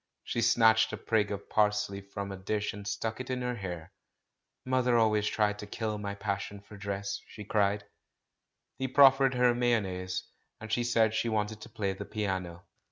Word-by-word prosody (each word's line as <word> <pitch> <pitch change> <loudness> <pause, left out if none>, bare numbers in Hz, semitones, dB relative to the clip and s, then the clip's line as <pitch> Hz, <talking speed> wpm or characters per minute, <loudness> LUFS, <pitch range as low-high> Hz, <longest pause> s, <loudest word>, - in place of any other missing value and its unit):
She 120 - -2
snatched 110 -1 +5
a - - -2
sprig 105 -3 +1
of 100 -1 -5
pars 105 0 +2
ley 100 0 -7
from 100 0 -6
a - - -4
dish 105 +2 -2
and 100 0 -8
stuck 110 +2 -3
it 130 - -8
in 125 -1 -2
her 125 0 -1
hair. 90 -4 -6 0.7
"Mother 125 -2 +2
always 105 -2 +3
tried 105 -1 +1
to 105 - -7
kill 110 0 -3
my 100 -1 -4
passion 100 0 -3
for 100 +1 -14
dress 100 0 -4
I" - - -27
she 105 - -9
cried. 105 0 +1 1.0
He 130 - 0
proffered 135 0 +6
her 125 -1 +4
mayonnaise, 95 -7 0 0.4
and 110 0 -8
she 120 - +1
said 115 -2 +3
she 115 - 0
wanted 105 0 -1
to - - -10
play 100 -2 -2
the 95 - -7
piano. 95 -5 -3
105 Hz, 190 wpm, -30 LUFS, 100-115 Hz, 1.0 s, proffered